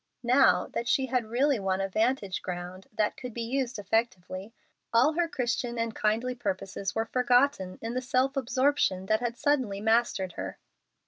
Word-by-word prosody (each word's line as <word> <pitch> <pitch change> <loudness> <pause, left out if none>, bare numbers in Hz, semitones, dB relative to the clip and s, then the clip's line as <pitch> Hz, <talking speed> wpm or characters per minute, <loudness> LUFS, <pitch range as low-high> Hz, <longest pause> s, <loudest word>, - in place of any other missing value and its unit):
Now 235 -7 +4
that 235 - -2
she 265 +1 +2
had 250 -3 -1
really 265 +2 +2
won 190 -1 0
a 195 - 0
vantage 215 -1 0
ground 180 +1 -6
that 215 -1 0
could 250 -3 -8
be 235 - -2
used 255 +1 -2
effectively, 200 -2 -2 0.4
all 250 +7 +4
her 345 +1 +1
Christian 245 -5 -2
and 230 -1 -1
kindly 225 +5 0
purposes 195 -4 -3
were 225 0 0
forgotten 245 -6 +2
in 225 +1 -3
the 255 - -1
self 260 +2 +1
absorption 260 -7 +1
that 215 +2 +2
had 240 0 -3
suddenly 260 -9 +1
mastered 220 -4 +1
her. - - -6
230 Hz, 170 wpm, -28 LUFS, 195-255 Hz, 0.4 s, Now